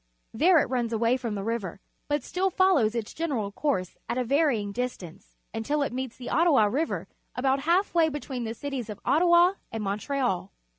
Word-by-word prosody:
There 335 +10 +5
it - - +3
turns 245 -3 -1
away 230 +2 +2
from 240 -5 -3
the 200 - -4
river, 205 -4 -3 0.3
but 290 -2 -1
still 380 +1 0
follows 350 - +3
its 225 -3 -3
general 265 -11 -2
course 200 - -2
at 235 - -1
a 250 - 0
varjdng 245 -7 +1
distance, 200 -7 -6 0.2
until 285 +7 -1
it 270 - -3
meets 260 -1 -4
the 250 - -9
Ottaica 285 -12 +3
River 315 +5 -1 0.3
about 265 +2 +1
half 345 +7 +1
way 330 -2 +4
between 275 -4 -5
the 225 0 -4
cities 265 -4 -5
of 205 -1 -7
Ottawa 345 +3 +5 0.2
and 225 -1 -4
^Montreal. 210 0 -1
255 Hz, 185 wpm, -27 LUFS, 220-300 Hz, 0.3 s, There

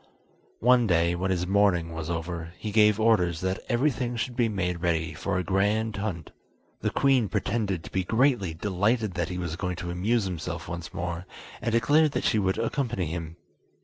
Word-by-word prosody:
One 120 -1 +5
day, 85 -2 +3
when 90 +2 -1
his 90 -1 0
mourning 90 -4 +2
was 80 0 -5
over, 85 0 -4
he 105 - -5
gave 105 0 +4
orders 90 -7 +2
that 95 0 -1
everything 125 -1 0
should 120 +1 -3
be 120 -2 +2
made 90 -4 -2
ready 85 -1 0
for 100 -2 -2
a 90 - 0
grand 105 +4 +1
hunt. 100 -6 -4 0.5
The - - 0
queen 130 -6 +2
pretended 100 -6 -1
to - - -10
be 95 - 0
greatly 110 - +2
delighted 105 +4 0
that 85 -2 -2
he 90 - -4
was 90 -3 -3
going 90 0 -3
to 85 0 -5
amuse 105 +6 +1
himself 85 -2 -4
once 85 0 -6
more, 90 -1 -4 0.3
and 115 - -1
declared 145 +6 +3
that - - -1
she 110 - +2
would 95 -1 0
accompany 115 -4 -1
him. 80 0 -5
95 Hz, 185 wpm, -27 LUFS, 85-110 Hz, 0.5 s, One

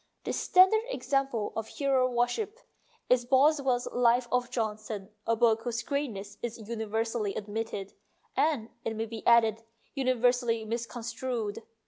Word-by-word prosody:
The - - -2
standard 375 +4 +5
example 275 - -1
of 225 -1 -3
hero 265 -1 +1
worship 245 - -1 0.5
is 250 -1 +4
Boswell's 265 -1 +3
" - - -16
Life 240 +1 +4
of 250 -1 +1
Johnson," 215 -4 -3 0.2
a 230 - +3
book 225 -1 +3
whose 235 -1 -3
greatness 225 -8 -4
is 230 -3 -5
universally 220 -1 -2
admitted, 205 -2 -4 0.4
and, 285 -8 +1
it 225 - -2
may 220 +1 -2
be 225 -1 -8
added, 225 -2 +5 0.3
universally 245 -3 +1
misconstrued. 235 -1 -3
235 Hz, 130 wpm, -29 LUFS, 220-255 Hz, 0.5 s, standard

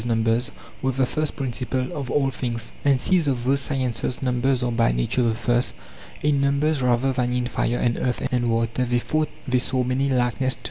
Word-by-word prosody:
num 115 -2 +1
bers) 115 +2 +1 0.3
were 130 - +1
the 130 +1 +2
first 155 +4 -1
principles 130 -2 -2
of 140 -3 -5
all 135 -2 +1
things. 115 -3 -4
And 140 -2 +3
since 175 +1 +2
of 125 -3 -1
these 135 +2 +3
(sciences) 130 -3 -1
numbers 130 0 +1
are 125 - 0
by 115 - +2
nature - - 0
the 115 -2 +2
first, 120 - 0 0.5
in 145 -2 +2
numbers 140 +1 +1
rather 125 +1 +2
than 125 -1 0
in 125 0 0
fire 120 -1 -1
and 120 -1 0
earth 125 - -1
and 120 -1 +1
water 115 +2 0
they 120 0 +1
thought 155 +5 0 0.2
they 125 -1 +2
saw 130 0 0
many 130 +2 0
likenesses 125 0 +1
to. - - -21
125 Hz, 205 wpm, -23 LUFS, 120-135 Hz, 0.5 s, And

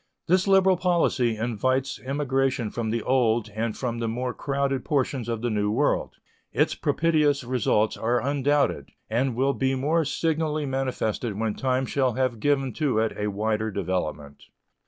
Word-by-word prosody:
This 185 +3 +2
liberal 190 -1 +5
policy 165 -10 +1
invites 130 +4 -1
emigration 135 -3 0
from 115 -2 -3
the 115 0 -1
Old 120 -4 +2
and 110 +1 -2
from 120 -3 -3
the 115 - -1
more 125 +2 -2
crowded 140 -2 -1
portions 130 -4 -1
of 115 -1 -3
the 120 - 0
New 105 -1 0
World. 105 - 0 0.4
Its - - +2
propitious 150 -4 +1
results 120 -3 +1
are 120 +2 +1
undoubted, 140 - 0 0.2
and 125 +2 +1
will 135 +3 +2
be 135 0 0
more 155 +5 +1
signally 155 0 -1
manifested 130 -5 -2
when 110 -1 0
time 130 +1 0
shall 130 -2 0
have 130 -2 -1
given 135 -1 +1
to 140 -4 0
it 110 0 +1
a 105 - -2
wider 110 +2 -1
development. 75 -7 -4
130 Hz, 155 wpm, -25 LUFS, 110-140 Hz, 0.4 s, liberal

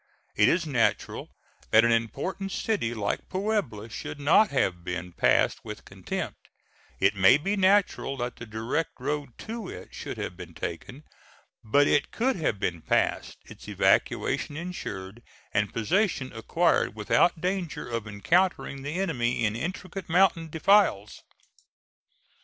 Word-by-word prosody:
It 105 +4 +5
is 170 -1 +1
natural 125 -7 0 0.4
that 110 +1 +6
an 115 - +3
important 140 - -1
city 195 - -1
like 100 -2 -3
Puebla 190 - -2
should 140 - -7
not 160 +9 +5
have 95 -10 0
been 90 0 -4
passed - - +2
with - - -8
contempt; - - -5 0.6
it 95 +2 +4
may 95 +6 +6
be 195 +7 -1
natural 195 -7 +2
that 120 -1 -4
the 120 - -9
direct 115 +9 -2
road 145 -5 -3
to 225 -3 -5
it - - -10
should - - -6
have 90 - -4
been 85 -2 -10
taken; 125 - -6 0.6
but 140 +7 +4
it 145 - +2
could 260 +3 0
have 145 - -1
been 85 -4 -2
passed, - - 0
its - - -13
evacuation 145 - +1
insured 115 - -6 0.3
and 100 -1 +1
possession 140 - 0
acquired 165 +3 +1
without 110 +10 +2
danger 180 -1 -2
of 115 -2 -4
encountering 140 - +1
the 145 +3 -5
enemy 125 -10 0
in 105 0 0
intricate 185 +7 -5
mountain 170 -2 +3
defiles. 160 - +3
140 Hz, 140 wpm, -27 LUFS, 110-180 Hz, 0.6 s, that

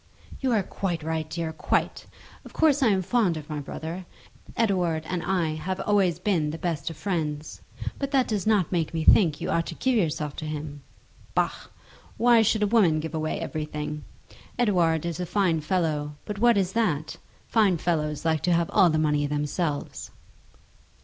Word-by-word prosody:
"You 265 -2 0
are 210 -3 +2
quite 175 -4 -3
right, 160 -1 -2
dear, 165 -1 -3
quite. - - -1 0.4
Of - - -13
course 300 -3 +3
I 260 - +5
am 195 -3 +2
fond 195 -5 +1
of 155 0 -8
my 150 - -3
brother. 165 +5 -6 0.5
Edouard 180 -8 +1
and 180 0 -3
I 175 -3 0
have 185 +5 -4
always 195 -5 +2
been 175 -5 0
the 155 - -4
best 165 -3 -2
of 165 - -9
friends. 155 -6 -3 0.4
But 275 - -2
that 270 -3 +2
does 210 -2 -2
not 205 -6 +2
make 165 -2 -1
me 160 - 0
think 155 -4 +5
you - - -3
ought 165 0 0
to 165 - -6
give 260 +7 +1
yourself 155 -7 -1
to 155 - -5
him. 150 -1 -5 0.5
Bah! - - +2 0.7
Why 235 0 +5
should 215 0 +2
a 210 +2 0
woman 175 -9 +4
give 160 +1 -5
away 155 -1 -2
everything? 150 -1 -4 0.5
Edouard 175 -9 +2
is 170 0 -3
a 180 - -2
fine 175 -5 +1
fellow. 150 -3 -1
But 205 -1 -5
what 235 -1 +5
is 190 -1 0
that? 165 -10 0 0.3
Fine 205 -6 +3
fellows 155 -2 -1
like 160 -2 +1
to 175 - +2
have 170 0 +1
all 190 -4 +5
the 155 - +1
money 150 -2 +1
themselves." 150 +1 -3
170 Hz, 185 wpm, -26 LUFS, 155-200 Hz, 0.7 s, I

